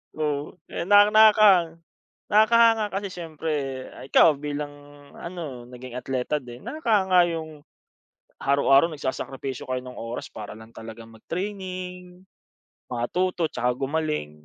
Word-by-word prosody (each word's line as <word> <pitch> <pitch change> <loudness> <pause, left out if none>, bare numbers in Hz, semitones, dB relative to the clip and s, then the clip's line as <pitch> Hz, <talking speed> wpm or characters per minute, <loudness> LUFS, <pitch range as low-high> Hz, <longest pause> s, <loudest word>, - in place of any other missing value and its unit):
oo. 150 -2 -2 0.2
Eh, 170 - -4
naka 205 +1 +7
nakang 205 -6 +5 0.5
nakakahanga 225 +1 +5
kasi 200 0 -3
siyempre 165 -3 -5 0.5
ikaw 150 +1 +5
bilang 145 0 -4 0.5
ano 155 -9 -7
naging 125 0 -10
atleta 130 +3 -2
din 120 0 -12
nakakahanga 205 - +2
yung 155 -2 -6 0.8
araw-araw 140 +2 +4
nagsasakripisyo 135 -3 -5
kayo 130 0 -2
ng 125 0 -9
oras 115 +1 -6
para 105 -1 -8
lang 110 +1 -14
talagang 115 0 -10
mag-training, 180 - -6 0.6
matuto, 170 +8 -1
tsaka 125 0 0
gumaling. 145 - -2
155 Hz, 110 wpm, -25 LUFS, 130-185 Hz, 0.8 s, naka